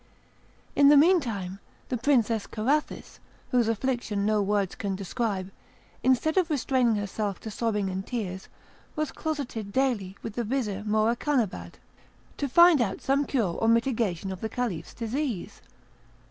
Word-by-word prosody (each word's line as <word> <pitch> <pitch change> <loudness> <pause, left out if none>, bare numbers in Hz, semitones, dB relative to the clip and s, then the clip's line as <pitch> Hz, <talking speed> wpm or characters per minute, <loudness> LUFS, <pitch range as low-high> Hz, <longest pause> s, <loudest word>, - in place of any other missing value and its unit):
In 285 0 +6
the 295 - +8
meantime 235 - +2 0.3
the 255 - 0
Princess 235 -4 +1
Carathis, 275 +8 -2 0.3
whose 245 -3 +3
affliction 225 -3 -1
no 215 0 +2
words 200 -1 0
can 200 -3 -3
describe, 195 -1 -3 0.5
instead 260 +6 +2
of 360 -2 +3
restraining 255 -5 +2
herself 205 -1 -3
to 220 - -6
sobbing 210 -2 -1
and 190 0 -3
tears, 190 -5 -5 0.5
was 305 -2 -2
closeted 265 -11 -4
daily 210 -7 0
with 225 - -5
the 240 - -2
Vizir 210 -4 -2
Morakanabad, 225 +2 0 0.6
to 280 - -2
find 340 -1 +7
out 200 -5 -1
some 280 +2 +1
cure 225 -12 0
or 225 - -1
mitigation 225 -6 +1
of 185 - -7
the 220 - -2
Caliph's 240 -10 -4
disease. 235 - -3
230 Hz, 140 wpm, -27 LUFS, 200-265 Hz, 0.6 s, the